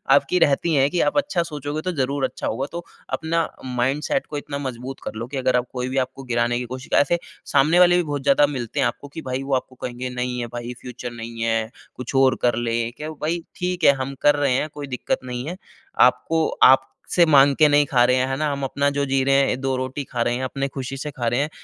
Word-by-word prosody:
आपकी 180 - +2
रहती 160 +2 +2
है 135 0 +4
कि 175 +1 0
आप 145 - +1
अच्छा 240 -12 +1
सोचोगे 150 -1 -5
तो - - +2
ज़रूर 135 +1 -1
अच्छा - - -4
होगा। 135 - -2
तो 170 0 -5 0.3
अपना 165 0 0 0.2
माइंडसेट 130 +3 -1
को 150 - -5
इतना 140 0 -5
मजबूत 130 -1 -6
कर - - -5
लो 115 +2 -5
कि 135 +2 -6
अगर 130 -1 +1
आप 125 - -1
कोई 125 0 -3
भी 135 - -3
आपको 135 +1 -13
गिराने 120 -1 0
की 125 - -4
कोशिश 130 +3 -8
ऐसे 170 +4 +1 0.3
सामने 155 +6 +4
वाले 175 0 +6
भी 180 - +2
बहुत 145 -3 -4
ज़्यादा 140 +1 +4
मिलते 130 -1 -4
हैं 135 - +3
आपको 145 - -6
कि 160 - -6
भई 130 +1 -2
वो 135 - -3
आपको 130 0 -4
कहेंगे, 125 0 -5
"नहीं 125 0 -3
है 120 - -3
भई 120 +1 -5
फ़्यूचर 125 -1 -7
नहीं 115 0 -7
है 115 -1 0 0.3
कुछ 125 +1 -6
और 135 -1 +5
कर 120 -2 +2
ले।" 115 0 -1
क्या 150 +5 -7
ओ 155 - -8
भई 170 +3 0 0.2
ठीक 180 -1 -3
है 140 - +7
हम 135 +1 -6
कर 145 0 +5
रहे 145 -3 +1
हैं 150 +4 0
कोई 145 -1 -7
दिक्कत - - -1
नहीं 125 0 -5
है। 180 +2 -5 0.5
आपको 160 -1 -1 0.2
आपसे 135 +6 +2
माँग 140 -3 +6
के 155 - +5
नहीं 145 0 +4
खा 125 -3 +3
रहे 125 +1 +3
हैं 130 0 +1
है 135 - -1
ना? 150 -1 0
हम 140 0 -4
अपना 140 +2 +1
जो 140 0 -1
जी 135 -1 +1
रहे 135 0 +3
हैं, 130 - -1
2 135 -1 0
रोटी 130 +2 -3
खा 120 - -2
रहे 120 - 0
हैं, 130 - -3
अपनी 135 +1 -2
खुशी 135 0 -6
से 150 +2 -5
खा 120 -3 -3
रहे 120 +3 +1
हैं 150 - -1
135 Hz, 255 wpm, -22 LUFS, 125-145 Hz, 0.5 s, है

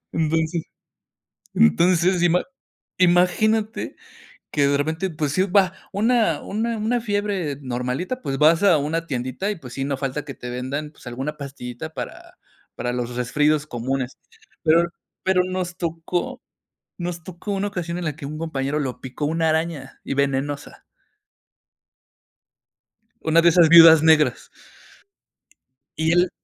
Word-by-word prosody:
entonces 160 +1 0 0.9
entonces, 175 - +4
ima 175 +1 +3 0.6
imagínate, 185 +5 +2 0.6
que 145 -2 +2
de 140 0 +2
repente, 160 +6 -1
pues, 150 -1 -2
iba 190 0 +3 0.2
una 215 -5 +2
una 225 +2 -2
una 235 +3 0
fiebre 205 - -2
normalita, 130 - -3
pues, 135 - -3
vas 165 +5 +5
a 180 -6 +6
una 160 +3 -2
tiendita, 130 - -2
y 205 - -5
pues, 125 -6 -11
sí, 135 - -3
no 140 -1 -2
falta 135 +1 -3
que 140 - -7
te 125 - -8
vendan, 135 +5 -4
pues, 145 - -16
alguna 130 +5 -4
pastillita, 140 +1 -7
para - - -8 0.4
para 120 - -3
los 125 0 -3
resfríos 150 +5 +1
comunes. 130 +1 -3 0.5
Pero 165 +2 +4 0.4
pero 190 -1 +3
nos 185 -1 -3
tocó 175 +9 -3 0.6
nos 175 -1 -4
tocó 185 +3 -6
una 200 +1 -1
ocasión, 175 -3 -4
en 180 - -4
la 155 -2 -2
que 155 -4 -7
un 150 +2 -6
compañero, 150 -3 -2
lo 130 -4 -4
picó 130 +3 -5
una 160 +1 +1
araña, 160 -4 -3
y - - -4
venenosa. 140 +1 -2 2.4
Una 160 +1 +4
de 170 - +6
esas 170 -1 +6
viudas 165 -1 +9
negras. 160 -1 +3 1.5
Y 160 +1 +1
él 175 +1 +3
160 Hz, 140 wpm, -22 LUFS, 140-180 Hz, 2.4 s, viudas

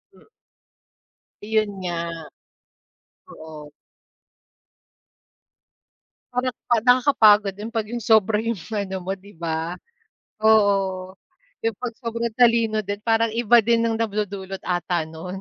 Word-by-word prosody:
M - - -22 1.2
Iyon 215 -1 +1
nga. 175 -2 -3 1.4
Oo. 155 -2 -11 2.6
Parang 250 0 -1 0.2
pa 240 - +4
nakakapagod 220 -6 +5
din 220 +3 -7
'pag 220 -2 -2
'yong 240 0 -4
sobra 220 -1 +4
'yong 225 -3 -3
ano 200 -3 -3
mo 190 +2 -3
'di 200 +2 -17
ba. 165 0 -3 0.7
Oo, 195 -3 +2 0.5
'yong 225 -2 0
pag 240 -2 -4
sobrang 230 -2 -3
talino 230 -3 +3
din, 205 +1 -4
parang 225 0 +1
iba 240 0 +4
din 230 0 +2
ang 225 - -1
nagdudulot 200 -3 -3
ata 175 -2 -2
no'n. 180 +4 -8
210 Hz, 115 wpm, -23 LUFS, 190-230 Hz, 2.6 s, nakakapagod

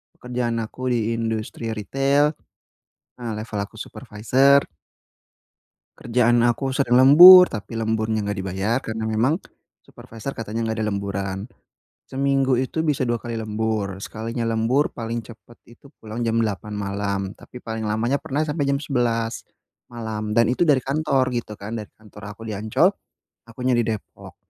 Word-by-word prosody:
pekerjaan 125 -1 -3
aku 130 +4 -6
di 115 -1 0
industri 115 0 -3
retail. 135 +7 +1 0.9
Ah, 120 -2 -5
level 110 0 -5
aku - - -30
supervisor. 130 +5 +2 1.3
Kerjaan 120 0 +2
aku 120 +3 +1
sering 130 -3 +2
lembur 175 +8 +10
tapi 115 +1 -6
lemburnya 110 -1 -1
enggak 100 0 -3
dibayar 95 +4 -1
karena 110 -2 -5
memang, 110 +7 +1 0.5
supervisor 115 +4 -9
katanya 115 -1 -4
enggak 110 0 -2
ada 110 - 0
lemburan. 100 -1 -3 0.7
Seminggu 135 -1 +1
itu 130 +5 -2
bisa 145 -5 0
2 120 - +1
kali 115 0 -5
lembur 110 -2 -2
sekalinya 115 +2 -4
lembur 115 +5 +1
paling 115 0 -4
cepet 115 +1 -15
itu 120 +4 -18
pulang 110 +1 -8
jam 115 - 0
8 105 0 -4
malam 100 -1 -3
tapi 125 +4 -13
paling 110 -1 -4
lamanya 115 +6 0
pernah 150 0 -2
sampai 150 -2 -2
jam 140 - +2
11, 115 -4 -1 0.4
malam 110 -3 -5
dan 115 0 +4
itu 170 +7 +1
dari 135 -4 +3
kantor 135 -2 0
gitu 120 -3 -4
kan 110 +3 -6
dari 105 - -8
kantor 105 -1 -11
aku 115 - -12
di 110 - -5
Ancol, 110 +1 +3 0.6
akunya 125 +2 -2
di 115 - 0
Depok, 110 -2 -6
115 Hz, 150 wpm, -22 LUFS, 110-130 Hz, 1.3 s, lembur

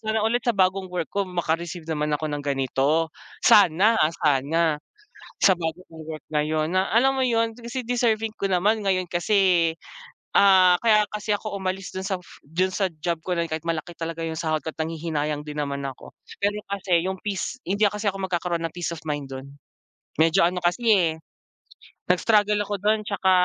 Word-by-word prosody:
sana 220 0 0
ulit 225 +2 +1
sa 240 - +2
bagong 190 -1 +1
work 175 -3 -2
ko 200 - -1
maka-receive 170 -2 -3
naman 150 -1 -1
ako 155 - -3
ng 145 -1 -4
ganito, 140 +3 +1 0.3
sana, 200 +3 +5
ah, 155 - +3 0.2
sana 150 +3 +2 0.6
sa 195 - +5
bago 165 0 -4
kong 160 -1 -10
work 155 -2 -7
ngayon 155 +2 0
na 190 +1 +2
alam 270 +3 +4
mo 265 - 0
yun 230 -2 +1
kasi 240 +1 -6
deserving 225 -3 +1
ko 195 -3 -2
naman. 205 +4 +2
Ngayon 185 -2 +1
kasi, 175 -2 +2 0.7
ah, 185 -2 +6
kaya 215 -2 +4
kasi 210 +1 -3
ako 205 0 -3
umalis 190 0 -3
dun 190 - -4
sa 190 -2 -2 0.2
dun 175 +6 0
sa 195 - +1
job 170 +1 -1
ko 185 - -2
na 170 -1 -1
yun - - -17
kahit 160 +1 -4
malaki 165 0 -3
talaga 165 0 -5
yung 160 -1 -3
sahod 155 -2 -1
ko't 160 - -6
nanghihinayang 155 -2 -2
din 150 0 -8
naman 140 -1 -2
ako, 135 -2 -8 0.3
pero 205 +1 0
kasi 185 -4 +1
yung 190 0 -2
peace 205 +4 -3
hindi 200 +4 +1
kasi 210 +1 -2
ako 195 - -2
magkakaroon 175 -2 -2
ng - - -22
peace 175 -1 -3
of 165 - -7
mind 145 -2 -3
dun. 135 +2 -9 0.7
Medyo 165 +1 +4
ano 180 -1 -4
kasi, 175 +8 +1 0.2
eh, 170 -3 +2 1.0
nag-struggle 210 +3 +3
ako 205 - -4
dun' 215 +1 +2
tsaka 195 -2 +1
180 Hz, 185 wpm, -24 LUFS, 160-205 Hz, 1.0 s, ah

